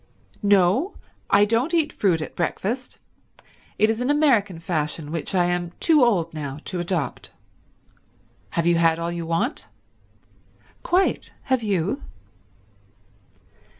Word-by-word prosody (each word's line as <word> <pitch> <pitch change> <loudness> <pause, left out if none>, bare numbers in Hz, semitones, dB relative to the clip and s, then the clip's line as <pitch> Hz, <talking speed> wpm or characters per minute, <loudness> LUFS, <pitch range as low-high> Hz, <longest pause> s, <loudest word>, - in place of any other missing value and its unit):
"No, 205 - +3 0.3
I 200 +1 +5
don't 235 +10 +1
eat 320 -3 +1
fruit 170 -6 +1
at - - -9
breakfast. 220 +8 -3 0.8
It 215 - +4
is 225 +2 -1
an 250 - -1
American 250 - +3
fashion 155 -2 -3
which 165 +4 -3
I 175 -1 +4
am 175 -1 -1
too 310 -5 +4
old 175 -9 +2
now 145 -3 -5
to 185 - -4
adopt. 170 -6 -3 1.2
Have 170 +9 -1
you 170 0 +3
had 165 -1 +3
all 170 0 -3
you 170 -1 -5
want?" 170 - -1 1.1
"Quite. 370 +2 0
Have 260 -2 +1
you?" 205 - -1
185 Hz, 125 wpm, -23 LUFS, 165-240 Hz, 1.2 s, I